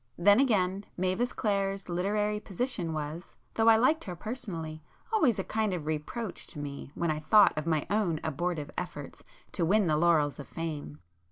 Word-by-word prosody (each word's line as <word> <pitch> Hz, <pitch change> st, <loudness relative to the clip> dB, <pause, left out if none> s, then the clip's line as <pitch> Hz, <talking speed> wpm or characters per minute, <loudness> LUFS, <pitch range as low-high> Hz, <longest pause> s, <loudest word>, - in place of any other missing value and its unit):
Then 205 Hz, +5 st, +6 dB
again, 200 Hz, -6 st, +2 dB
Mavis 185 Hz, +7 st, 0 dB
Clare's 195 Hz, -2 st, -1 dB
literary 210 Hz, +4 st, 0 dB
position 200 Hz, -4 st, -3 dB
was, 155 Hz, +2 st, -5 dB, 0.2 s
though 225 Hz, 0 st, +2 dB
I 225 Hz, -, +9 dB
liked 260 Hz, +8 st, +3 dB
her 180 Hz, -, -5 dB
personally, 170 Hz, -7 st, -5 dB, 0.3 s
always 290 Hz, -, +3 dB
a 190 Hz, -, -1 dB
kind 215 Hz, -2 st, -1 dB
of 160 Hz, -4 st, -5 dB
reproach 155 Hz, +9 st, -4 dB
to -, -, -10 dB
me 140 Hz, -2 st, -6 dB
when 170 Hz, -2 st, 0 dB
I 155 Hz, -, -2 dB
thought 210 Hz, +6 st, +5 dB
of 155 Hz, +1 st, -3 dB
my 155 Hz, -3 st, +1 dB
own 190 Hz, -5 st, +1 dB
abortive 160 Hz, 0 st, -2 dB
efforts -, -, -7 dB, 0.3 s
to -, -, -1 dB
win 200 Hz, +5 st, +3 dB
the 155 Hz, -3 st, +2 dB
laurels 155 Hz, -3 st, +3 dB
of 140 Hz, -, -8 dB
fame. 150 Hz, -, -5 dB
180 Hz, 175 wpm, -30 LUFS, 155-210 Hz, 0.3 s, I